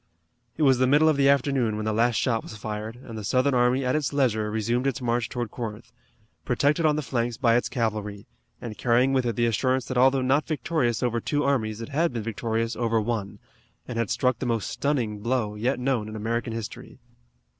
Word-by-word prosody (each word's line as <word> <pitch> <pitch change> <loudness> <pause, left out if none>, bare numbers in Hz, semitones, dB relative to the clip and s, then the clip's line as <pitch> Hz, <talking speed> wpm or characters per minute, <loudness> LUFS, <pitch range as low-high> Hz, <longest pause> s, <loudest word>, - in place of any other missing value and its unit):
It 155 - +1
was 135 -3 +4
the 130 - +3
middle 145 +4 +5
of 155 - +4
the 140 0 +4
afternoon 135 -5 +2
when 110 0 -3
the 110 - 0
last 115 +2 +2
shot 115 0 +1
was 110 - -10
fired, 105 +2 -5
and 115 - -9
the 110 - -6
Southern 130 +7 +2
army 125 +2 +2
at 125 - +1
its 150 -3 0
leisure 115 -7 +1
resumed 115 +4 0
its 135 - -1
march 120 -2 -1
toward 120 -3 -4
Corinth, 115 -2 -6 0.5
protected 145 +6 +2
on 150 - +2
the 150 - -2
flanks 120 -1 -2
by 120 -3 +3
its 120 - +1
cavalry, 105 -4 -3 0.3
and 110 -3 -8
carrying 125 +3 +3
with 130 -2 +1
it 115 - -1
the 120 - +2
assurance 130 +3 +1
that 130 -1 -1
although 130 +1 +4
not 135 +4 +2
victorious 150 -7 -1
over 120 -1 0
two 145 +4 0
armies 110 -6 0
it 115 - -6
had 160 +3 +1
been 115 -3 -4
victorious 115 +1 -2
over 115 -1 +1
one, 110 -3 -3 0.5
and 115 -2 -4
had 115 - -1
struck 125 -3 +1
the 130 - -2
most 115 -3 -1
stunning 120 -8 -1
blow 115 -1 -1
yet 120 +5 -1
known 125 -4 -1
in 110 - -8
American 115 +2 -2
history. 115 -1 -7
120 Hz, 215 wpm, -25 LUFS, 110-130 Hz, 0.5 s, middle